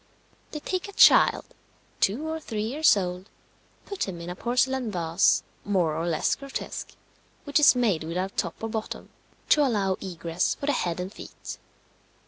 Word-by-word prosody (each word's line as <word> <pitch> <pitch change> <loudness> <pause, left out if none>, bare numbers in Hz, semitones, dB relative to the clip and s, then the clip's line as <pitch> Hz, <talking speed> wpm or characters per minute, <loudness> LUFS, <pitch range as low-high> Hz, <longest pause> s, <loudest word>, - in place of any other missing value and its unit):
They 300 - -6
take 370 +5 -3
a 405 - -10
child, - - +6 0.5
two 250 +11 +1
or 320 0 -3
three 220 -8 -4
years 270 +2 +4
old, 180 +1 -4 0.6
put 400 - -3
him 180 -3 -6
in 170 +1 -6
a - - -6
porcelain 250 +3 0
vase, 170 -1 +2 0.2
more 180 -6 +1
or 165 +2 -2
less 160 -2 +1
grotesque, 275 -1 -6 0.5
which 285 +1 +2
is 290 - +7
made 215 -10 +1
without 180 +4 -3
top 170 - -2
or 225 - -2
bottom, 220 -1 -5 0.4
to 300 - +5
allow 200 -8 +1
egress 170 -2 -2
for - - -6
the 290 - +2
head 175 -9 -1
and 185 +3 -5
feet. - - -9
200 Hz, 165 wpm, -26 LUFS, 180-265 Hz, 0.6 s, is